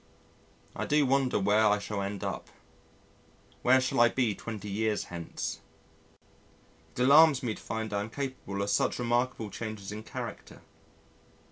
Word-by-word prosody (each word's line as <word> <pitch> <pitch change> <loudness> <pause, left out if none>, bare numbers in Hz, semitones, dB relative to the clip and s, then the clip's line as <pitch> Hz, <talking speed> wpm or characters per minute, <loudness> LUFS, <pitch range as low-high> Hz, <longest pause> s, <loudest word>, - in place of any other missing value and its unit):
I - - -3
do 150 -1 +3
wonder 135 -3 +2
where 105 +2 +3
I 105 -1 +4
shall 105 0 -4
end 100 -1 -4
up; - - -4 1.1
what 130 +1 +5
shall 130 - 0
I 120 0 +7
be 120 -4 +1
twenty 105 -1 -7
years 105 +1 0
hence? 85 -1 -5 1.4
It - - -3
alarms 145 0 +6
me 115 -3 -1
to - - -11
find 110 -1 -4
I 100 - +1
am 105 - -5
capable 120 -7 -4
of 100 - -1
such - - +1
remarkable 120 -2 -1
changes 110 -3 -6
in 105 +1 -6
character. - - -8
110 Hz, 150 wpm, -29 LUFS, 105-130 Hz, 1.4 s, I